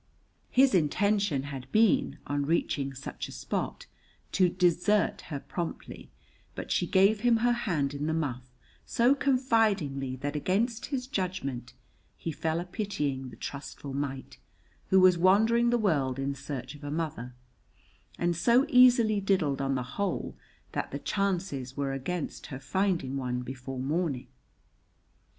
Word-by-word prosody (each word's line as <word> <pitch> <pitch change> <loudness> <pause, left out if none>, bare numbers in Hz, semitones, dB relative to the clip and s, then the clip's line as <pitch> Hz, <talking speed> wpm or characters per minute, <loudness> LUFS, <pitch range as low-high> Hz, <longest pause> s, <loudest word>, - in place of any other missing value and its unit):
His 265 -1 +4
intention 190 -2 +2
had 135 -2 -7
been, 220 -2 +3
on 145 0 -1
reaching 140 -3 0
such 135 - -6
a - - -10
spot, - - -4 0.5
to 185 -2 +4
desert 180 +4 +2
her 145 -4 -3
promptly, 170 +4 -6 0.5
but - - -6
she - - +1
gave 200 +2 +4
him 235 +1 +4
her 245 - +4
hand 170 - 0
in 145 +1 -3
the 160 - 0
muff 130 -6 -3 0.3
so 240 +3 +3
confidingly 220 - +1
that 145 +3 -4
against 220 - 0
his 265 -3 -3
judgment 140 - -4 0.4
he 165 - -4
fell 160 +2 -1
a 175 - -4
pitying 150 -9 -3
the 120 - -12
trustful 140 0 -7
mite 135 -1 -4 0.5
who 190 - +6
was 185 -2 +6
wandering 220 +6 +4
the 240 - +3
world 145 - +1
in 135 +1 -1
search 140 -1 -6
of 145 0 -13
a 145 - -4
mother, 145 -6 -4 0.8
and 175 0 0
so 240 - +4
easily 245 -6 +6
diddled 180 -9 +1
on 135 0 0
the 125 - -1
whole 165 +11 -3 0.4
that - - -3
the - - -4
chances 175 -10 -2
were 140 -1 -1
against 145 +5 -4
her 135 - -7
finding 175 -5 0
one 125 -1 -2
before 130 +1 -7
morning. 145 -1 -1
165 Hz, 145 wpm, -29 LUFS, 135-200 Hz, 0.8 s, who